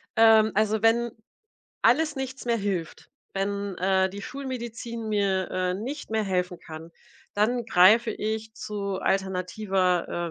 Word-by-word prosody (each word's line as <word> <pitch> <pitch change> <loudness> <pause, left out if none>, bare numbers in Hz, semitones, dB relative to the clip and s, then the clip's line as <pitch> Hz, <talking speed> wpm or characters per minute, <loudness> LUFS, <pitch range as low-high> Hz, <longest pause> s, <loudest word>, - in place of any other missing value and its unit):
ähm, 220 -1 +6
also, 215 +1 +1
wenn 235 +1 +3 0.7
alles 295 +5 +3
nichts 265 0 -5
mehr 235 -1 +2
hilft, 195 -6 -4 0.2
wenn, 200 0 -2
äh, 190 +1 +2
die 200 +2 -8
Schulmedizin 235 -4 -6
mir, 195 -3 0
äh, 185 0 -1
nicht 255 +7 -6
mehr 220 0 +1
helfen 180 -2 -1
kann, 160 +1 -10 0.4
dann 235 +4 +1
greife 220 +4 +5
ich 220 +1 -4
zu 200 -3 -4
alternativer, 185 -2 0
210 Hz, 130 wpm, -26 LUFS, 190-230 Hz, 0.7 s, ähm